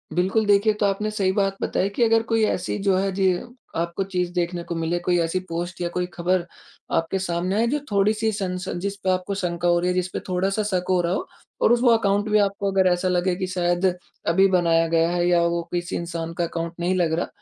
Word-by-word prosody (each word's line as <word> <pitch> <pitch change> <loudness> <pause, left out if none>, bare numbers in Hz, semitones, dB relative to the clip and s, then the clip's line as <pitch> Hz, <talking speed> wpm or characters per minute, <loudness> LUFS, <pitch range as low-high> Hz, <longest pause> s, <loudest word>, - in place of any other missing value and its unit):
बिल्कुल, 190 +5 +2
देखिए, 205 +1 +4
ये 210 - -6
तो - - +2
आपने 200 +2 0
सही 195 -3 +1
बात 195 0 0
बताई 195 - 0
कि 240 - +2
अगर 225 0 +4
कोई 225 -1 +1
ऐसी 185 -2 -2
जो 195 -2 +3
है, 195 +1 0
जी, 190 -1 +2 0.4
आपको 170 +3 -1
चीज़ 180 -2 -2
देखने 175 0 -2
को 170 - -5
मिले, 165 +1 -1
कोई 175 0 +1
ऐसी 165 +2 0
पोस्ट 175 +2 -4
या 175 - 0
कोई 180 0 0
खबर 180 0 0 0.5
आपके 165 +4 -1
सामने 180 +1 -1
आए 225 +2 +2
जो 290 +5 0
थोड़ी 200 +1 +3
सन 210 -4 -1
सन 180 -1 -4
जिस 200 +2 -3
पे 190 - +1
आपको 185 +1 0
शंका 175 -2 -2
हो 175 0 +4
रही 175 - -1
है, - - +1
जिस 180 0 0
पे - - -2
थोड़ा-सा 195 +3 0
शक 185 -3 -1
हो 185 -1 +3
रहा 170 +1 0
हो - - -3 0.3
और - - +4
उस 240 - +2
वो 245 - +5
अकाउंट 205 -1 +1
भी 210 - +4
आपको 200 0 0
अगर 190 -1 +3
ऐसा 175 +1 0
लगे 180 0 +1
कि 185 0 -3
शायद 175 0 0 0.4
अभी 190 +4 +5
बनाया 165 -2 +3
गया 165 0 +2
है 175 0 +1
या 175 -1 +4
वो 170 0 0
किसी 175 -1 -2
इंसान 165 -1 -4
का 175 - -2
अकाउंट 170 0 -3
नहीं 180 +2 0
लग 170 -3 +1
रहा। - - -2
185 Hz, 245 wpm, -23 LUFS, 175-195 Hz, 0.5 s, वो